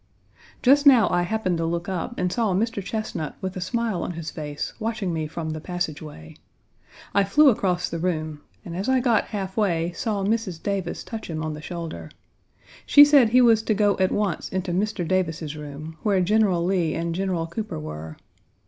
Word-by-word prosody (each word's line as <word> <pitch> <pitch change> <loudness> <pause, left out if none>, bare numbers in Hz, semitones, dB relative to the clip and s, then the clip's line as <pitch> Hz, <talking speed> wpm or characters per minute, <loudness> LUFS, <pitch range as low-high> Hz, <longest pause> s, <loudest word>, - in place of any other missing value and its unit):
Just 285 +3 +5
now 250 -6 +7
I 175 - +2
happened 185 -2 -1
to 165 - 0
look 170 +1 -2
up 190 +6 -4
and 180 0 -1
saw 220 -6 +1
Mr. 215 0 -1
Chesnut 215 -7 -4
with 190 0 -4
a 185 - -4
smile 220 -1 -1
on 180 - -3
his 165 -1 -6
face 150 -1 -5
watching 220 -5 -2
me 160 -1 -2
from 160 0 -5
the 155 0 -5
passageway. 155 - -5 0.8
I 200 - +4
flew 290 +9 +5
across 180 -6 0
the 170 - -4
room, 155 -4 -2 0.2
and 170 - -6
as 195 +7 -2
I 260 0 +4
got 240 -4 +2
half 195 -3 -5
way 175 -6 +1
saw 205 +1 -2
Mrs. 205 -5 -1
Davis 195 -3 -2
touch 225 -4 -7
him 160 -1 -3
on 155 -1 -3
the 150 - -8
shoulder. 160 - -6 0.7
She 290 - +8
said 285 -6 +6
he 250 +3 +5
was 230 -3 +5
to 220 -1 0
go 205 -1 +3
at 185 0 +2
once 205 -5 -1
into 185 -1 -2
Mr. 190 -1 -1
Davis's 165 -4 -1
room, 150 +2 -8
where 205 -4 +2
General 185 -2 +2
Lee 175 -4 +1
and 170 0 -2
General 180 -2 -1
Cooper 210 - -5
were. 75 +1 -7
185 Hz, 195 wpm, -24 LUFS, 165-215 Hz, 0.8 s, She